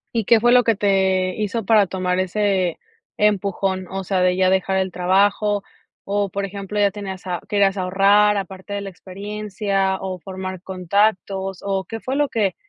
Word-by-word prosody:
¿Y 225 Hz, -3 st, 0 dB
qué 230 Hz, +2 st, +5 dB
fue 240 Hz, +2 st, +3 dB
lo 250 Hz, 0 st, +6 dB
que 230 Hz, -1 st, +2 dB
te 190 Hz, -2 st, +1 dB
hizo 215 Hz, +1 st, -2 dB
para 210 Hz, -1 st, +5 dB
tomar 180 Hz, 0 st, -1 dB
ese 185 Hz, -2 st, 0 dB, 0.4 s
empujón? 195 Hz, -2 st, 0 dB
O 195 Hz, 0 st, -4 dB
sea, 185 Hz, 0 st, 0 dB
de 180 Hz, 0 st, +3 dB
ya 185 Hz, 0 st, +3 dB
dejar 190 Hz, 0 st, +1 dB
el 190 Hz, -1 st, 0 dB
trabajo, 200 Hz, +3 st, +2 dB, 0.4 s
o, 200 Hz, 0 st, -1 dB
por 200 Hz, +2 st, -3 dB
ejemplo: 200 Hz, +1 st, -5 dB
¿Ya 205 Hz, -1 st, +4 dB
tenías 195 Hz, -2 st, -7 dB
a 175 Hz, -1 st, -2 dB
querías 200 Hz, -1 st, +2 dB
ahorrar 200 Hz, +3 st, +4 dB
aparte 195 Hz, 0 st, -6 dB
de 200 Hz, -, -3 dB
la 195 Hz, -, -6 dB
experiencia?, 195 Hz, 0 st, -3 dB
¿o 190 Hz, -1 st, -4 dB
formar 185 Hz, 0 st, -7 dB
contactos? 190 Hz, 0 st, 0 dB
¿O 195 Hz, -1 st, -1 dB
qué 225 Hz, 0 st, -6 dB
fue 260 Hz, +4 st, -3 dB
lo 290 Hz, 0 st, +2 dB
que 210 Hz, -7 st, 0 dB
195 Hz, 180 wpm, -21 LUFS, 185-205 Hz, 0.4 s, lo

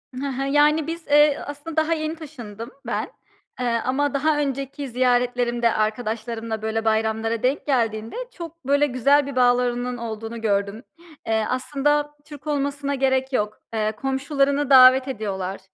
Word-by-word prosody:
Hı 265 Hz, +2 st, -4 dB
hı, 270 Hz, 0 st, -3 dB
yani, 295 Hz, +2 st, +3 dB
biz, 330 Hz, 0 st, -6 dB
eee, 295 Hz, 0 st, +5 dB
aslında 290 Hz, +2 st, -7 dB
daha 315 Hz, +1 st, +2 dB
yeni 310 Hz, 0 st, -3 dB
taşındım 240 Hz, -8 st, -9 dB
ben. -, -, -3 dB, 0.5 s
Eee, 250 Hz, -, -1 dB, 0.2 s
ama 285 Hz, +3 st, 0 dB
daha 295 Hz, +2 st, +1 dB
önceki 275 Hz, 0 st, -3 dB
ziyaretlerimde 245 Hz, -1 st, +1 dB
arkadaşlarımla, 220 Hz, 0 st, -2 dB
böyle, 220 Hz, +1 st, -2 dB
bayramlara 220 Hz, +1 st, 0 dB
denk 260 Hz, +3 st, 0 dB
geldiğinde 225 Hz, -5 st, 0 dB, 0.2 s
çok, 335 Hz, -3 st, -10 dB
böyle, 285 Hz, +1 st, +3 dB
güzel 275 Hz, +3 st, +3 dB
bir 280 Hz, -1 st, -6 dB
bağlarının 245 Hz, 0 st, +2 dB
olduğunu 225 Hz, 0 st, -6 dB
gördüm. 200 Hz, +1 st, -1 dB, 0.4 s
Eee, 220 Hz, -1 st, +1 dB
aslında 295 Hz, +3 st, 0 dB
Türk 295 Hz, 0 st, -12 dB
olmasına 285 Hz, -1 st, -1 dB
gerek 265 Hz, 0 st, 0 dB
yok. 210 Hz, -3 st, -1 dB, 0.2 s
Eee, 215 Hz, -1 st, 0 dB
komşularını 275 Hz, +3 st, 0 dB
davet 260 Hz, 0 st, +8 dB
ediyorlar. 195 Hz, -6 st, -4 dB
255 Hz, 140 wpm, -23 LUFS, 225-285 Hz, 0.5 s, davet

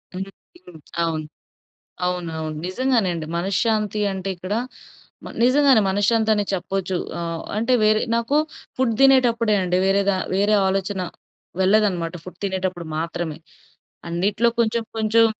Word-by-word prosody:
హ్మ్. 190 Hz, -, -2 dB, 0.4 s
హ్మ్. 170 Hz, -3 st, -12 dB, 0.2 s
అవును. 160 Hz, -2 st, -2 dB, 0.8 s
అవును. 180 Hz, -1 st, -2 dB
అవును. 155 Hz, -1 st, -4 dB
నిజంగానే 235 Hz, 0 st, +1 dB
అండి. 160 Hz, -2 st, -4 dB
మనశ్శాంతి 210 Hz, +3 st, 0 dB
అంటే, 190 Hz, 0 st, -4 dB
ఇక్కడ 185 Hz, +3 st, -4 dB, 0.7 s
మ -, -, -7 dB
నిజంగానే 265 Hz, -1 st, +5 dB
మనశ్శాంతనె 210 Hz, +2 st, +2 dB
చెప్పచ్చు. 190 Hz, 0 st, -2 dB, 0.2 s
ఆహ్, 165 Hz, -1 st, -4 dB
అంటే 230 Hz, +4 st, +1 dB
వేరే 215 Hz, 0 st, +4 dB
నాకు 235 Hz, +6 st, +1 dB, 0.4 s
ఫుడ్ 255 Hz, -3 st, +2 dB
తినేటప్పుడే 240 Hz, -5 st, +4 dB
అండి 180 Hz, 0 st, +1 dB
వేరేగా 195 Hz, 0 st, +2 dB, 0.2 s
వేరే 205 Hz, +2 st, +3 dB
ఆలోచన 190 Hz, 0 st, -1 dB, 0.6 s
వెళ్ళదనమాట, 185 Hz, -4 st, +2 dB
ఫుడ్ 185 Hz, -, -11 dB
తినేటప్పుడు 185 Hz, -3 st, -3 dB
మాత్రమే. 165 Hz, -1 st, -3 dB, 0.7 s
అన్నిటిలో 200 Hz, +7 st, +1 dB
కొంచెం, 230 Hz, 0 st, 0 dB
కొంచెం 220 Hz, +1 st, +4 dB
195 Hz, 120 wpm, -22 LUFS, 180-225 Hz, 0.8 s, నిజంగానే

